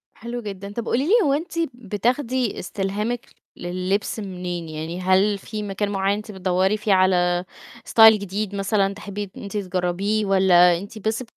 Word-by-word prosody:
حلو 235 +1 -6
جدًا، 200 -1 -7
طَب 235 +1 -4
قُولي 265 +4 0
لِي - - +1
هو 280 - +2
أنتِ 310 +5 -3 0.2
بتاخدي 245 +2 -1
استلهامِك 205 +6 -3 0.2
لللبس 185 +5 -2
منين؟ 180 -4 -5
يعني 160 +3 -5
هل 190 +2 +3
في 210 +1 -6
مكان 200 +1 -2
معيّن 195 0 +1
أنتِ 215 0 -8
بتدوّري 190 +2 +1
فيه 210 -1 +1
على 180 -1 +3 0.4
style 220 -1 +9
جديد 200 0 -3
مثلًا 195 0 +1
تحبّي 200 -1 -6
إن - - -8
أنتِ 200 0 -8
تجرّبيه، 195 +2 -1
والّا 180 -3 +5
أنتِ 205 +4 -9
بس 225 +3 -1
200 Hz, 160 wpm, -23 LUFS, 185-215 Hz, 0.4 s, style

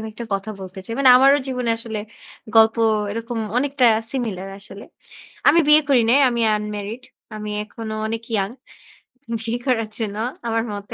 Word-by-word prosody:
আমি 220 - -6
একটা 235 +2 -7
কথা 195 +2 -4
বলতে 190 0 -9
চাই। 230 - -7
মানে 270 -2 +6
আমারও 275 +2 +6
জীবনে 250 -3 -2
আসলে 225 -2 -5 0.6
গল্প 220 0 +6 0.3
এরকম 230 +2 -4 0.2
অনেকটা 270 -1 +2 0.2
সিমিলার 210 -8 -4
আসলে। 200 0 -12 0.6
আমি 335 - +6
বিয়ে 300 +1 +7
করি 260 -4 +4
নাই, 270 - +5
আমি 240 -1 -1 0.2
আনম্যারিড। 210 +2 -5 0.3
আমি 210 0 -6
এখনো 220 0 -7
অনেক 225 +1 -4
ইয়ং, 195 -1 0 0.9
বিয়ে 230 +2 -3
করার 225 -4 +1
জন্য 210 -2 -3 0.3
আমার 225 0 0
মতে, 205 0 -8
225 Hz, 160 wpm, -21 LUFS, 210-250 Hz, 0.9 s, বিয়ে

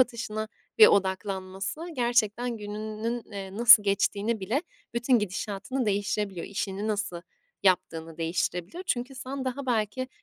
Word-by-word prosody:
atışına 220 -3 0 0.3
bir 440 - +11
odaklanması 190 +3 0
gerçekten 240 -1 +1
gününün, 215 +2 -4
eee, 195 -1 -6
nasıl 235 -1 +9
geçtiğini 205 +2 0
bile 235 - 0 0.3
bütün 235 +1 +3
gidişatını 210 +5 -3
değiştirebiliyor. 200 -2 -1
İşini 200 +1 -3
nasıl 205 -5 -2 0.4
yaptığını 165 -4 +1
değiştirebiliyor. 175 - -2
Çünkü 250 +2 -1
sen 265 +1 -5
daha 260 +1 -3
belki, 240 +2 0
210 Hz, 115 wpm, -27 LUFS, 195-240 Hz, 0.4 s, bir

